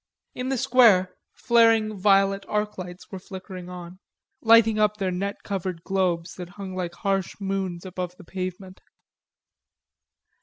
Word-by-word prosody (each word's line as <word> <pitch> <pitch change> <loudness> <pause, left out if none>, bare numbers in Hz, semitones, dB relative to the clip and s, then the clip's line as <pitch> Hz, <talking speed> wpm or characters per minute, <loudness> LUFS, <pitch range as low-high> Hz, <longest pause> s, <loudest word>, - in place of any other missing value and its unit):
In 250 +1 -4
the 270 - 0
square, 220 -7 +5 0.2
flaring 225 -3 +3
violet 195 0 +3
arclights 190 -4 -4
were 190 - -6
flickering 185 -1 -9
on, 180 0 -9 0.4
lighting 225 -1 +5
up 210 0 +2
their 190 -3 -1
net 200 +3 -4
covered 185 -4 -4
globes 180 -3 -1
that 180 -2 -7
hung 195 -2 -6
like 175 -2 -4
harsh 195 0 -1
moons 195 -3 -3
above 180 -1 -5
the - - -13
pavement. 185 +1 -6
190 Hz, 130 wpm, -25 LUFS, 180-210 Hz, 0.4 s, square